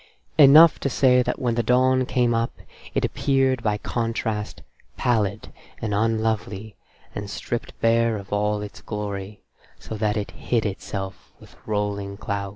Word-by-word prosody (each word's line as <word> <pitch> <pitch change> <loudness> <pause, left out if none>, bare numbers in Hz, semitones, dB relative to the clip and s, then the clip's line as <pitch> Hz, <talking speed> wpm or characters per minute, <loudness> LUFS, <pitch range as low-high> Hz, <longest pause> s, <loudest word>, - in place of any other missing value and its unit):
Enough 150 +3 +8
to 140 - -1
say 125 -1 +4
that - - -2
when 120 -2 0
the 120 - +1
dawn 130 +1 +3
came 120 -2 +2
up 115 0 0 0.4
it - - +2
appeared 135 -2 +1
by 105 -2 0
contrast 110 -1 -3 0.3
pallid 110 -4 0 0.3
and 105 -2 -3
unlovely 110 -1 -1 0.4
and 105 -1 -5
stripped 120 +3 -5
bare 115 -1 +3
of 100 0 -8
all 105 0 0
its 105 - -9
glory, 105 -1 -5 0.3
so - - -9
that 105 0 0
it 105 - -3
hid 115 -3 -1
itself 95 -1 -5
with - - -17
rolling 100 -2 -2
clouds. 100 -1 -3
110 Hz, 150 wpm, -24 LUFS, 105-120 Hz, 0.4 s, Enough